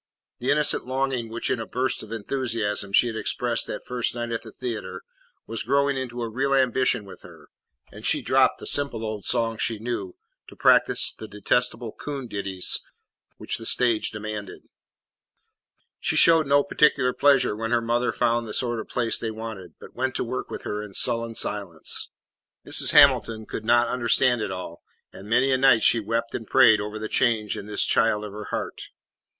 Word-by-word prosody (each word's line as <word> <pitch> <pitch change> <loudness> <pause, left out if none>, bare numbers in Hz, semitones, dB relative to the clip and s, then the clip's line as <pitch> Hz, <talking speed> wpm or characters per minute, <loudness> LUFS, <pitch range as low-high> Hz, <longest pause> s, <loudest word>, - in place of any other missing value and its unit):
The 125 - -3
innocent 150 -3 +2
longing 130 -3 -2
which 115 +3 -3
in 130 - 0
a 115 - -5
burst 130 +1 -2
of 110 - -11
enthusiasm 115 -3 -2
she 110 - +4
had 115 -2 -3
expressed 120 +1 0
that - - -6
first 125 -1 -2
night 120 -1 -4
at 115 - -2
the 115 -1 -11
theatre 100 -6 -6 0.4
was 115 -1 -5
growing 140 +3 +1
into 125 -2 -4
a - - -2
real 135 +5 0
ambition 130 -4 +1
with 95 - -12
her, - - -15 0.4
and - - -12
she - - +3
dropped - - +3
the - - -10
simple 140 -6 -1
old 110 -2 -5
songs 115 -2 +1
she 115 - -1
knew 105 -5 -5 0.3
to - - -13
practise - - +3
the 110 - -10
detestable 115 +3 0
coon 140 -1 -6
ditties 100 -4 -2 0.6
which - - -4
the 115 - -9
stage 120 -3 +1
demanded. 105 -2 -7 1.3
She - - -1
showed 165 -3 +5
no 140 +1 +4
particular 145 -3 +2
pleasure 135 -6 +3
when 115 +1 -4
her 120 0 +2
mother 120 +1 0
found 120 -1 0
the 105 - -6
sort 120 -2 -2
of 110 - -7
place 115 -2 +1
they 115 - -3
wanted, 110 -6 -8
but - - -13
went 130 +1 -2
to - - -1
work 125 +2 -5
with - - -7
her 105 0 -4
in 105 -2 -10
sullen 115 -1 +1
silence. 100 -8 -1 0.6
Mrs. - - +3
Hamilton 110 -1 +5
could 110 - -7
not 120 +1 +4
understand 120 0 +1
it 105 - -2
all, 90 -2 -7 0.3
and 100 +2 -11
many 125 +4 +3
a 130 - +2
night 130 -4 +5
she 115 - +5
wept 115 +2 -3
and 115 - -5
prayed 110 -5 +5
over 105 +1 -5
the 110 0 -5
change 110 -4 +1
in 100 - -8
this 105 - +1
child 105 -2 +2
of 105 - -8
her 105 0 -7
heart. - - -5
115 Hz, 190 wpm, -24 LUFS, 110-125 Hz, 1.3 s, showed